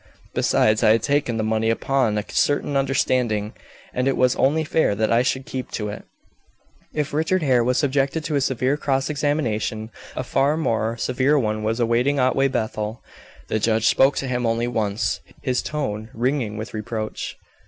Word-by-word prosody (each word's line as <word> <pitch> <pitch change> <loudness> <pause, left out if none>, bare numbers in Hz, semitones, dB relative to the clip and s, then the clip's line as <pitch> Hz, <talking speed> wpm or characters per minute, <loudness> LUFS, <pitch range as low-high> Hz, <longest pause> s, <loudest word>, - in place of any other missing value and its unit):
Besides, 110 0 +2
I 110 - +6
had 115 - +1
taken 140 -5 +1
the 110 - 0
money 110 0 +1
upon 115 -1 +1
a 105 - -2
certain 145 0 +1
understanding, 125 -6 +1 0.4
and 125 +1 0
it 135 - +1
was 125 0 +3
only 150 +4 +2
fair 155 -8 +1
that 110 +1 0
I 115 +1 +4
should 130 +1 -1
keep 130 -1 -5
to 105 -1 -2
it." 105 - -7 0.9
If 150 -2 -2
Richard 160 +4 +1
Hare 125 -4 +3
was 125 +2 +1
subjected 140 +2 +1
to 155 - -2
a 140 - +2
severe 130 +2 +1
cross 135 -1 0
examination, 115 -7 -1 0.2
a - - -2
far 140 +3 +1
more 115 -6 0
severe 130 +5 +2
one 110 -4 0
was 110 +2 -1
awaiting 120 +4 +2
Otway 130 +1 +3
Bethel. 110 -3 -3 0.4
The 110 - 0
judge 110 0 +1
spoke 135 +4 +4
to 135 - -2
him 125 -1 -1
only 115 +1 0
once, 105 -3 -1 0.2
his 125 -1 0
tone 110 -8 -3
ringing 120 -3 -1
with 110 +2 -6
reproach. 110 0 -4
125 Hz, 175 wpm, -22 LUFS, 110-135 Hz, 0.9 s, I